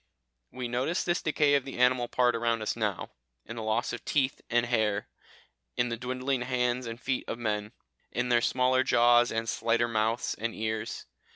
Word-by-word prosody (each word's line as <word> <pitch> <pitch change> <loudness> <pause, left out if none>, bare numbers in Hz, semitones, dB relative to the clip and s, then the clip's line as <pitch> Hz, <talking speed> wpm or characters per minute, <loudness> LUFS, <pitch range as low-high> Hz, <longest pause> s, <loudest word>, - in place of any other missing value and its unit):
We 125 -1 -4
notice 125 +8 -1
this 175 0 0
decay 150 -2 +2
of 140 -2 +3
the 135 - -8
animal 125 -1 +3
part 125 -1 +2
around 115 -1 0
us - - -1
now, 105 -5 -2 0.3
in 115 - -7
the 115 - -5
loss 110 +3 -1
of - - -6
teeth 135 -3 0
and 120 0 +2
hair, 110 -4 0 0.7
in 120 - +1
the 115 - -2
dwindling 130 +2 -2
hands 125 0 0
and 115 0 -6
feet 130 0 -2
of - - -3
men, 105 -2 -2 0.4
in 125 +2 -1
their 120 -1 +4
smaller 130 +1 +2
jaws, 120 -1 +4
and 115 0 -2
slighter 115 +1 +1
mouths 110 +1 0
and 115 0 -3
ears. 110 0 -3
120 Hz, 185 wpm, -29 LUFS, 115-125 Hz, 0.7 s, their